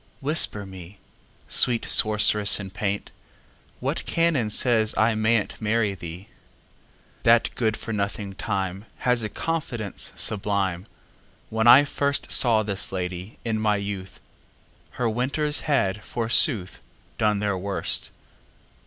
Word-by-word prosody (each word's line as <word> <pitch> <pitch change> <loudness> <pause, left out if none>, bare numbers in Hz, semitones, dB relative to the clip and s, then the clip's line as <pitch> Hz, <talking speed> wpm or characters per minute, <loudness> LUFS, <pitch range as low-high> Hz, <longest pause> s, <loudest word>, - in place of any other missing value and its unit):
Whisper 140 -8 +1
me, 95 0 -12 0.5
Sweet 120 -2 +3
sorceress 105 -1 +5
in 95 -2 -8
paint, 105 0 -4 0.7
What - - -3
canon 165 -10 0
says 110 -1 +2
I 110 +1 +3
may 110 +2 +2
n'tMarry 110 -2 -2
thee? 85 +2 -10 0.9
That 115 0 +3
good 110 -2 -1
for 115 - -6
nothing 100 -1 -4
TimeHas 100 +5 -2
a 105 - -3
confidence 125 - -4
sublime! 100 -2 0 0.6
When 110 +1 0
I 130 +4 +8
firstSaw 135 -6 +1
this 100 -1 -3
lady, 90 +1 -6
in 110 -2 -1
my 105 -1 +1
youth, 100 -2 -6 0.8
Her 125 - 0
winters 140 +6 -1
had, 105 -7 0
forsooth, 115 - +2 0.4
Done 105 -1 +1
their 100 -1 -1
worst. 95 +1 0
105 Hz, 115 wpm, -24 LUFS, 100-115 Hz, 0.9 s, I